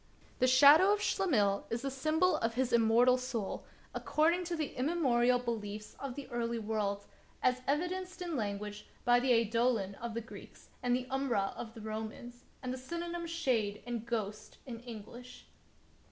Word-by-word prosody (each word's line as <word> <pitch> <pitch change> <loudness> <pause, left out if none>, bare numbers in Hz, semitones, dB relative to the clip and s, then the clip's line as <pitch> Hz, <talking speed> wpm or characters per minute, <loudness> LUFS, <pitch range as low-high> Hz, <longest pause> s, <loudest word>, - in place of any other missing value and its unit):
The 255 - +4
shadow 290 +9 +8
of 415 - +2
Schlemihl 215 - +1
is 235 +2 -3
the 275 - -2
symbol 315 +7 +2
of 230 0 -1
his 255 -1 0
immortal 235 +2 +5
soul, 240 -5 -4 0.3
according 335 +4 +1
to 340 0 -2
the 310 -3 -3
immemorial 250 -4 +2
beliefs 215 -3 -5
of 275 -3 -5
the 285 - -7
early 235 -1 -2
world, 210 -2 -2 0.4
as 255 0 +3
evi 295 +6 +2
denced 370 0 -6
in 350 -3 -3
language 210 -2 -4 0.2
by 245 0 +5
the 255 +1 +1
eidolon 230 -3 +2
of 235 -1 -5
the 230 - -2
Greeks, 230 - -13
and 245 -1 +2
the 255 0 -2
iimbra 260 -7 0
of 225 0 -7
the 225 - -9
Romans, 220 +3 -6 0.2
and 255 0 -2
the 260 - -6
synonyms 340 +4 -4
shade 235 -12 0
and 240 -2 -3
ghost 215 -3 -4
in 235 -3 -7
English. 240 +1 -10
245 Hz, 170 wpm, -33 LUFS, 225-275 Hz, 0.4 s, shadow